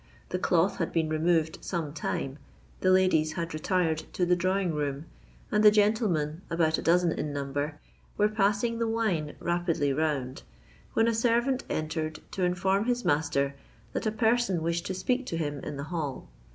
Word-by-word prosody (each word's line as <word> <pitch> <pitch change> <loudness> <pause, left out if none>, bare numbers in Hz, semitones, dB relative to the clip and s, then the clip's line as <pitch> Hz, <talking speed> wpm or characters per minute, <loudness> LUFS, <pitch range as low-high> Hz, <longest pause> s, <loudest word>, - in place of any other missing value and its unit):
The 180 - -2
cloth 180 +1 +2
had 165 - -1
been 160 -2 0
removed 160 0 +1
some 165 -5 -3
time—the 145 +4 -4
ladies 185 -4 +3
had 165 0 -4
retired 160 0 +1
to 180 - +1
the 180 0 +3
drawing 185 0 0
room—and 150 +8 -3
the 210 - +10
gentlemen, 205 -7 +1
about 160 -1 +1
a - - -4
dozen 175 0 +3
in 150 - -3
number, 145 +1 -3 0.4
were 210 - +4
passing 215 +2 +1
the 230 - +1
wine 205 -10 -1
rapidly 170 -5 0
round, 140 -4 -1 0.5
when 225 - +3
a 230 - +2
servant 240 +3 +1
entered 155 0 -2
to 190 - -2
inform 190 +3 +1
his 245 0 0
master 145 -2 +1 0.4
that - - -1
a - - +1
person 220 -5 +1
wished 170 +1 -1
to 190 - -3
speak 250 +7 -1
to 165 - -2
him 145 -3 -2
in 140 - -6
the 140 - -4
hall. 150 -6 -3
170 Hz, 165 wpm, -28 LUFS, 155-205 Hz, 0.5 s, the